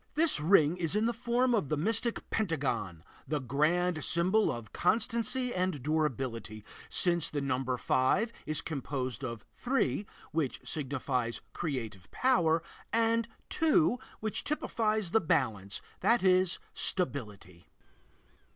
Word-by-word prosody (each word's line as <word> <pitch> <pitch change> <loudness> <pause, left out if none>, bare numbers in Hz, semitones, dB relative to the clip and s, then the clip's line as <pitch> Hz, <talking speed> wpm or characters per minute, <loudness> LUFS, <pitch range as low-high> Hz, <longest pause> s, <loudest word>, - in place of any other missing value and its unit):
This 315 - +4
ring 160 0 +4
is 170 +1 -2
in 215 +1 +2
the 235 - +1
form 245 +2 +1
of 200 - +1
the 155 - 0
mystic 225 +8 0
Pentagon, 130 - -1 0.2
the 150 -1 -1
grand 155 +6 +1
symbol 185 +6 +2
of 120 -3 -7
constancy 235 +5 +1
and 180 -7 -1
durability, 130 -8 -2 0.2
since 170 -3 +2
the 145 - -2
number 130 -2 -1
five 190 - +1
is 155 0 0
composed 135 -3 -4
of 115 -4 -5
three, 210 - 0 0.2
which 155 -5 -1
signifies 130 -5 -2
creative 115 - -4
power, 170 -11 +2 0.3
and 230 0 +2 0.2
two, 320 -5 +3 0.2
which 215 -1 -2
typifies 215 - -1
the 225 - +4
balance, 110 - 0 0.2
that 235 -2 +3
is, 185 -1 +4 0.2
stability. 105 - -1
160 Hz, 125 wpm, -31 LUFS, 130-215 Hz, 0.3 s, This